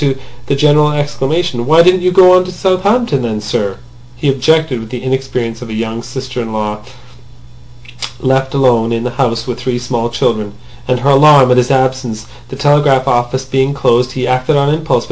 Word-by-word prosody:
To 135 -2 0 0.3
the 140 - 0
general 150 +1 +3
exclamation, 145 -2 -2
"Why 160 +3 +5
didn't 180 +1 +3
you 180 - +2
go 180 0 +6
on 185 - +4
to 185 - -7
Southampton, 190 - 0
then, 110 -3 -3
sir?" 105 -2 -3 0.4
he 140 +4 -1
objected 135 -3 0
the 125 0 -7
inexperience 130 -3 -3
of 120 - -8
a 110 - -5
young 115 +1 -4
sister 125 +1 -6
in 115 -1 -6
law 105 -1 -3 1.4
left 130 +1 0
alone 120 -4 +2
in 115 0 -2
the 125 - -3
house 115 -3 -1
with 125 -2 -5
three 125 -2 -2
small 120 -1 -3
children, 110 -3 -2 0.3
and 125 -1 0
her 140 +2 +2
alarm 140 -2 +6
at 125 - +3
his 125 0 +2
absence, 130 -4 -1 0.2
the - - -7
telegraph 140 -1 +2
offices 125 +1 -1
being 135 +1 0
closed. 125 -1 +1
He 130 - -4
had 125 0 +1
acted 135 +4 -1
on 140 +1 +1
impulse. 160 0 0
130 Hz, 190 wpm, -13 LUFS, 120-145 Hz, 1.4 s, go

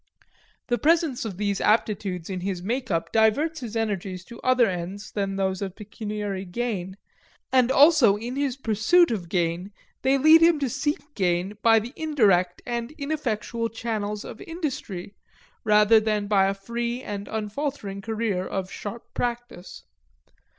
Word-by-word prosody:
The 240 -1 0
presence 315 -6 +2
of 200 -5 -5
these 200 -1 -1
aptitudes 200 -5 +1
in 190 -2 -4
his 185 -1 -3
make 245 +5 -2
up 165 -3 -1
diverts 275 +9 +2
his 235 -4 -7
energies 195 -4 -2
to 235 - -12
other 255 -1 +4
ends 185 +2 -5
than 195 -1 -2
those 190 -1 -1
of 195 -2 -4
pecuniary 210 -2 -5
gain; 190 -1 -4 0.5
and 255 -1 +4
also 280 -7 +6
in 235 +4 -5
his 275 -2 -1
pursuit 265 - +3
of 185 -7 -3
gain 175 +2 -1 0.3
they 265 +1 +3
lead 315 +4 +7
him 335 -1 +6
to 275 -4 -1
seek 295 +1 -2
gain 185 0 0
by 225 -1 +6
the 230 +4 -2
indirect 200 - +2
and 235 +2 -3
ineffectual 240 -6 -2
channels 215 -2 -3
of 225 - -9
industry, 265 - -5 0.5
rather 210 +1 +6
than 215 -1 0
by 200 -2 +3
a 195 - -1
free 235 +5 -4
and 200 -1 -5
unfaltering 215 -2 -4
career 220 -3 -1
of 185 0 -4
sharp 220 +3 -6
practice. 240 -6 -4
220 Hz, 150 wpm, -25 LUFS, 195-250 Hz, 0.5 s, lead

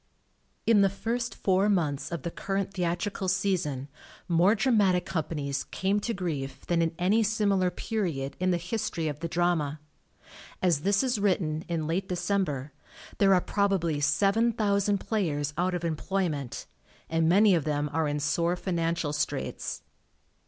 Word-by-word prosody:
In 220 -3 +5
the 195 - +5
first 230 +5 -3
four 195 +2 +2
months 155 -8 0
of 170 -5 -4
the 170 - -3
current 195 +1 -3
theatrical 180 +2 -2
season 165 -9 0 0.4
more 175 +5 +4
dramatic 200 -6 +3
com 160 -4 -2
panies 140 -4 -3
came 195 +2 0
to 235 - -2
grief 145 -9 -4
than 170 -1 +1
in 165 0 0
any 200 +6 +3
similar 200 -4 +2
period 175 -8 -3
in 185 +1 +1
the 175 - +2
history 180 -2 -2
of 150 -1 -4
the 170 - -3
drama. 165 -4 0 0.8
As 175 -5 +2
this 200 - +2
is 250 -4 0
written 170 -6 0
(in 165 -2 -2
late 175 +5 -2
December) 175 -7 -1 0.5
there 195 -1 +6
are 180 - +3
probably 190 -7 0
7,000 200 +5 +2
players 150 -9 -1
out 180 +2 0
of 170 -1 -3
em 165 -2 0
ployment, 160 - -2 0.4
and 165 0 +1
many 200 +3 +6
of 165 -4 +2
them 150 0 -1
are 160 -1 +1
in 145 0 -1
sore 170 +5 +1
financial 170 -4 -1
straits. 150 - -3
175 Hz, 155 wpm, -28 LUFS, 155-200 Hz, 0.8 s, there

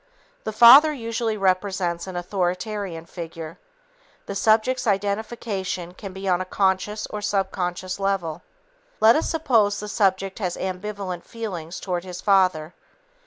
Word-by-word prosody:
The - - -2
father 255 +8 +9
usually 230 -4 -2
represents 185 -2 0
an 185 - -7
authoritarian 180 0 -3
figure. 165 -2 -8 0.7
The - - -5
subject's 225 +5 +2
identification 200 -3 -2
can 195 +1 -8
be 190 +1 -7
on 180 -1 +2
a - - 0
conscious 195 +3 0
or 210 - -4
subconscious 185 -2 -2
level. 195 -5 -1 0.6
Let 225 +1 +6
us 315 - 0
suppose 225 -10 +2
the 210 - -6
subject 195 -2 0
has 180 -4 -2
ambivalent 190 -1 -4
feelings 185 -7 -6
toward 180 -2 -3
his 180 -1 -7
father. 185 -5 +2
195 Hz, 130 wpm, -23 LUFS, 180-210 Hz, 0.7 s, father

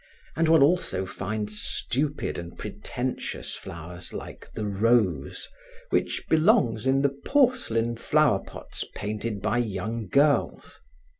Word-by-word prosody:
And 165 +1 +2
one 160 -3 +6
also 145 - +2
finds 105 +2 -3
stupid 145 -2 -1
and 85 0 -9
pretentious 125 +1 -4
flowers 85 +1 -8
like - - -8
the 110 - -4
rose 100 - +1 0.4
which - - 0
belongs 155 - +3
in 135 +1 +3
the 140 -1 +1
porcelain 240 - +2
flowerpots 145 -5 0
painted 105 0 -3
by 110 +3 +1
young 110 0 -2
girls. 140 +7 +2
115 Hz, 115 wpm, -26 LUFS, 100-145 Hz, 0.4 s, one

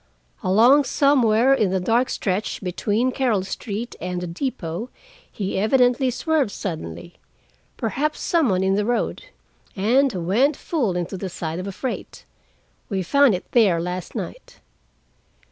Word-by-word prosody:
Along 235 +10 +5
somewhere 260 -3 +3
in 215 -7 +2
the 190 +1 0
dark 235 +7 +1
stretch 195 +2 -2
between 210 +7 0
Carol 245 -8 +1
Street 210 +4 -5
and 180 +1 -3
the 180 - -4
depot 185 +1 -4 0.4
he 195 -2 -3
evidently 250 +4 +3
swerved 300 0 0
suddenly—perhaps 195 - -6
some 330 -7 +2
one 185 -1 +1
in 190 0 +2
the 205 +1 +1
road—and 240 - -1
went 260 - +2
full 235 - -1
into 175 +2 -3
the 190 +1 -5
side 165 -1 -4
of 185 - -5
a - - -3
freight. 245 +7 -6 0.6
We 195 -3 -1
found 280 +3 +4
it 180 - -8
there 205 -8 +4
last 180 +1 -5
night." - - -7
215 Hz, 135 wpm, -22 LUFS, 185-260 Hz, 0.6 s, Along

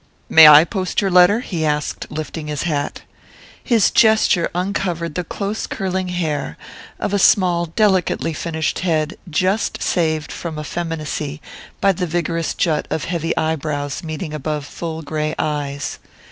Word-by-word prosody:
"May 160 -1 +9
I 150 +1 +10
post 185 0 -2
your 195 -2 0
letter?" 180 +5 +5
he 170 -9 -3
asked, 150 -1 -2
lifting 155 0 -5
his 150 -1 -3
hat. 150 -4 -2 0.6
His 230 -6 +3
gesture 220 -6 +4
uncovered 180 -3 -2
the 180 - -2
close 200 +4 -4
curling 190 -2 -2
hair 155 - -2 0.4
of 205 - -2
a 200 - +2
small 175 -3 +3
delicately 185 -2 +1
finished 160 0 -2
head 160 -1 0
just 185 +7 0
saved 155 -3 0
from 165 -3 -6
effeminacy 155 -2 -4 0.4
by 195 - +4
the 180 -1 -2
vigorous 165 0 -2
jut 155 -3 0
of 160 - -2
heavy 165 -1 -2
eye 160 0 +1
brows 145 -2 -4
meeting 155 0 -5
above 150 0 -3
full 160 +1 -6
grey 155 +1 -2
eyes. 145 -2 -3
165 Hz, 145 wpm, -19 LUFS, 155-180 Hz, 0.6 s, I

